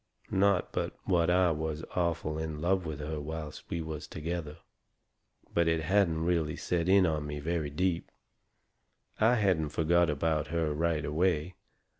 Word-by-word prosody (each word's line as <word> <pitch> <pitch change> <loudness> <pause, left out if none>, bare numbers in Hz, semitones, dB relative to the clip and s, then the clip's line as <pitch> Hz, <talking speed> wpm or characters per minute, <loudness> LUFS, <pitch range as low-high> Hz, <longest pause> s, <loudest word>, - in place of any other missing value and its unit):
Not 100 -1 +2
but - - -2
what 85 -3 +2
I 90 -1 +4
was 80 0 -3
awful 85 -3 0
in 80 -1 -4
love 90 +1 +1
with 75 -2 -5
her 75 0 -4
whilst 75 0 -6
we 85 -1 -2
was 80 -1 -6
together. 80 -1 -4 1.0
But 85 -1 +3
it 80 0 +2
hadn't 85 -2 +2
really 85 -3 +1
set 85 0 -1
in 95 -1 +6
on 75 -3 -1
me 75 0 -4
very 80 0 -1
deep. 85 +3 -1 1.1
I 115 +3 +5
hadn't 95 -9 +2
forgot 85 +2 +2
about 75 +1 0
her 80 -1 0
right 80 0 0
away. 80 +2 +1
80 Hz, 155 wpm, -30 LUFS, 75-90 Hz, 1.1 s, in